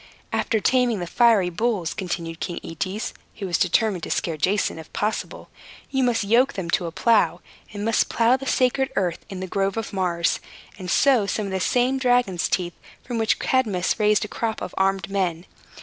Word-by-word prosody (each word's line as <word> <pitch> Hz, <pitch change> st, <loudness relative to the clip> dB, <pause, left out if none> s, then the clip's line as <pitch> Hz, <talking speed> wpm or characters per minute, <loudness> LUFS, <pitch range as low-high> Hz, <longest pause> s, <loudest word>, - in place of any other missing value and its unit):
"After 220 Hz, -, +1 dB
taming 250 Hz, 0 st, +2 dB
the 175 Hz, -, -3 dB
fiery 210 Hz, -2 st, +3 dB
bulls," 200 Hz, -3 st, -1 dB
continued 170 Hz, -3 st, -4 dB
King 175 Hz, -, -4 dB
Aetes, 185 Hz, +6 st, -4 dB, 0.2 s
who 205 Hz, -, -5 dB
was 175 Hz, -2 st, 0 dB
determined 185 Hz, +1 st, +2 dB
to -, -, -6 dB
scare 165 Hz, -, -1 dB
Jason 185 Hz, +3 st, 0 dB
if 160 Hz, -, -12 dB
possible, 210 Hz, +1 st, -3 dB, 0.4 s
"you 265 Hz, -1 st, +1 dB
must 240 Hz, -3 st, +2 dB
yoke 235 Hz, +6 st, +3 dB
them 180 Hz, -4 st, -4 dB
to 175 Hz, -, +1 dB
a -, -, -5 dB
plow, 180 Hz, -3 st, +2 dB, 0.3 s
and 205 Hz, 0 st, -5 dB
must 225 Hz, -1 st, +2 dB
plow 235 Hz, +2 st, +3 dB
the 270 Hz, +1 st, -6 dB
sacred 260 Hz, +1 st, +2 dB
earth 180 Hz, -3 st, -1 dB
in 190 Hz, -2 st, -6 dB
the 185 Hz, -, -4 dB
Grove 195 Hz, +2 st, -1 dB
of 225 Hz, -2 st, -4 dB
Mars, 175 Hz, -3 st, 0 dB, 0.4 s
and 185 Hz, -1 st, -6 dB
sow 250 Hz, -1 st, +4 dB
some 210 Hz, +2 st, -1 dB
of 195 Hz, -, -5 dB
the 190 Hz, -, -1 dB
same 250 Hz, +6 st, +1 dB
dragon's 245 Hz, -9 st, +2 dB
teeth 175 Hz, -2 st, -1 dB, 0.3 s
from 240 Hz, -3 st, -3 dB
which 220 Hz, -1 st, +2 dB
Cadmus 215 Hz, -8 st, 0 dB
raised 210 Hz, 0 st, +3 dB
a -, -, -6 dB
crop 225 Hz, +1 st, -3 dB
of -, -, -6 dB
armed 190 Hz, -1 st, +1 dB
men. 185 Hz, -4 st, -1 dB
200 Hz, 195 wpm, -23 LUFS, 180-230 Hz, 0.4 s, sow